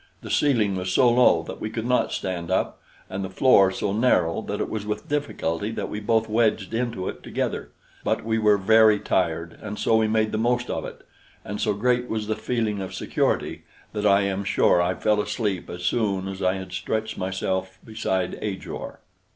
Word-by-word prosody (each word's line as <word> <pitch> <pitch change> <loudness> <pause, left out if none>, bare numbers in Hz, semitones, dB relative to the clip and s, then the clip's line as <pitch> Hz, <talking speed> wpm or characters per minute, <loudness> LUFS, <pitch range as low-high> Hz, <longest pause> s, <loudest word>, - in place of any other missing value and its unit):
The - - -6
ceiling 115 -9 +2
was 90 0 -2
so 125 +7 +5
low 120 -9 +5
that - - -8
we 110 - -2
could 110 0 -4
not 125 0 +2
stand 85 -3 -3
up, - - -1 0.3
and 95 +1 -4
the 95 - -4
floor 100 -1 +5
so 95 +1 -2
narrow 110 -5 +2
that 105 -1 -4
it - - -1
was 110 -2 -4
with 105 0 -4
difficulty 105 - -2
that - - -4
we 105 - -4
both 110 +1 +1
wedged 110 -2 +1
into 115 -5 -2
it - - -5
together; - - -3 0.3
but - - -1
we 110 0 +1
were 105 -1 +4
very 110 +1 +5
tired, 85 -3 -1
and 105 -1 -6
so 110 - +3
we 110 -1 +3
made 110 0 +1
the 110 - -1
most 120 +1 +1
of - - -3
it; - - -10 0.4
and 105 +1 -4
so 105 -2 +1
great 125 +3 +1
was 110 -1 -2
the 110 +1 -1
feeling 110 -3 -1
of 95 - -6
security - - -1 0.3
that 105 -1 0
I 100 0 +5
am 100 0 -1
sure 90 -2 +3
I 90 +1 0
fell 105 +1 +2
asleep 105 -3 -2
as 90 0 -7
soon 95 0 0
as 95 0 -6
I 95 +1 +2
had 95 -1 -7
stretched 110 +4 -2
myself 95 0 -2
beside 95 -5 -2
Ajor. 100 -3 -5
105 Hz, 200 wpm, -24 LUFS, 95-110 Hz, 0.4 s, so